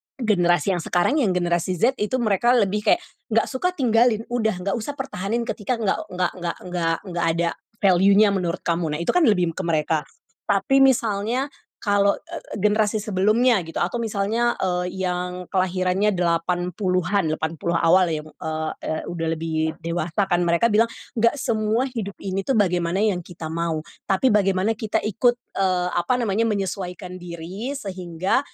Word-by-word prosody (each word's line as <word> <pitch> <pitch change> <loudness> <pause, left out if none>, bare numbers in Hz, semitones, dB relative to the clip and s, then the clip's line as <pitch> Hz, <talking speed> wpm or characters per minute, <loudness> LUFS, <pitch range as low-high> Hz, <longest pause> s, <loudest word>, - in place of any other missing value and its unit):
generasi 195 -6 +2
yang - - -2
sekarang 175 - +1
yang 195 -9 +1
generasi 175 +1 0
Z 245 +9 +1
itu 210 +5 0
mereka 230 +3 +3
lebih 210 -3 +2
kayak 350 - +3 0.3
enggak 225 +1 +3
suka 275 +7 0
tinggalin 230 -4 +3
udah, 220 -4 +1
enggak 195 - 0
usah 280 +6 -5
pertahanin 235 -4 -3
ketika 235 +1 -2
enggak 220 -4 0
enggak 180 -1 -1
enggak 175 -1 -3
enggak 170 -2 -1
enggak 175 -2 -2
ada 170 0 +1 0.3
valuenya 195 +2 +5
menurut 180 -4 -2
kamu. 165 -3 -1
Nah 150 - -4
itu - - +1
kan 360 - +3
lebih 180 -5 +3
ke 185 +3 -5
mereka. 155 -1 +1 0.5
Tapi 210 +7 +3
misalnya 240 +1 +1 0.3
kalo, 200 -1 +3
eee, - - -9 0.2
eee, - - -5
generasi 210 +1 +2
sebelumnya 215 +3 +3
gitu 165 - -10
atau 210 +7 -2
misalnya, 225 +2 0
eee, 180 0 -1
yang 180 0 -3
kelahirannya 185 +2 +1
80-an 180 +2 0
80 165 +2 -2
awal 180 +2 +5
yang, 155 -1 -2
eee, 155 0 -4 0.2
eee, 155 - -2
udah 165 -2 -3
lebih 160 0 -2
dewasa 170 +3 -1
kan 175 -2 +2
mereka 170 +7 +3
bilang 220 +2 +4 0.3
enggak 235 +3 +3
semua 220 0 +1
hidup 205 -5 -5
ini 195 0 -2
tuh 270 - +1
bagaimana 180 -2 +1
yang 205 -5 +1
kita 165 -2 -8
mau, 165 -1 -1 0.3
tapi 205 +6 +3
bagaimana 195 0 +2
kita 215 -2 0
ikut, 240 +3 +2 0.2
eee, 185 -2 +1
apa 175 +9 0
namanya 220 -2 +1
menyesuaikan 185 -3 -4
diri 175 +7 -6
sehingga, 185 -5 -1
190 Hz, 160 wpm, -23 LUFS, 175-220 Hz, 0.5 s, valuenya